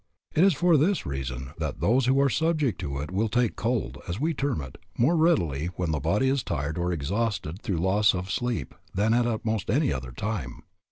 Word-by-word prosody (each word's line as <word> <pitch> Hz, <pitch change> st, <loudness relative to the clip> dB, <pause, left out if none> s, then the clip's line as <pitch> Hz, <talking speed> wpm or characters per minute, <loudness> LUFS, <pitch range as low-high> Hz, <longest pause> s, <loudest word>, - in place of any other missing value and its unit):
It 160 Hz, -, +4 dB
is 195 Hz, -4 st, +5 dB
for 170 Hz, +2 st, +4 dB
this 175 Hz, +7 st, +2 dB
reason 65 Hz, -1 st, -4 dB
that -, -, -3 dB
those 125 Hz, +3 st, +2 dB
who 135 Hz, +1 st, +4 dB
are 140 Hz, -, +4 dB
subject 155 Hz, -4 st, 0 dB
to 70 Hz, -1 st, -3 dB
it 75 Hz, +4 st, -6 dB
will 105 Hz, +4 st, 0 dB
take 120 Hz, 0 st, +2 dB
a -, -, -26 dB
cold, 115 Hz, 0 st, -2 dB
as 90 Hz, +5 st, -3 dB
we 160 Hz, +4 st, +1 dB
term 140 Hz, -, -1 dB
it, 65 Hz, -3 st, -8 dB, 0.2 s
more 140 Hz, +9 st, +3 dB
readily 85 Hz, -, +2 dB
when 85 Hz, -2 st, -1 dB
the 75 Hz, -, 0 dB
body 105 Hz, -, +1 dB
is 135 Hz, 0 st, +2 dB
tired 75 Hz, -1 st, -3 dB
or 90 Hz, +1 st, 0 dB
exhausted 90 Hz, +2 st, -2 dB
through 100 Hz, -8 st, -2 dB
loss 95 Hz, +4 st, +3 dB
of 90 Hz, +1 st, -4 dB
sleep 120 Hz, -2 st, -2 dB, 0.2 s
than 105 Hz, +4 st, +2 dB
at 120 Hz, -2 st, +1 dB
most 110 Hz, -4 st, -1 dB
any 140 Hz, -, +2 dB
other 65 Hz, -2 st, -5 dB
time. 105 Hz, -, -4 dB
110 Hz, 215 wpm, -26 LUFS, 85-135 Hz, 0.2 s, is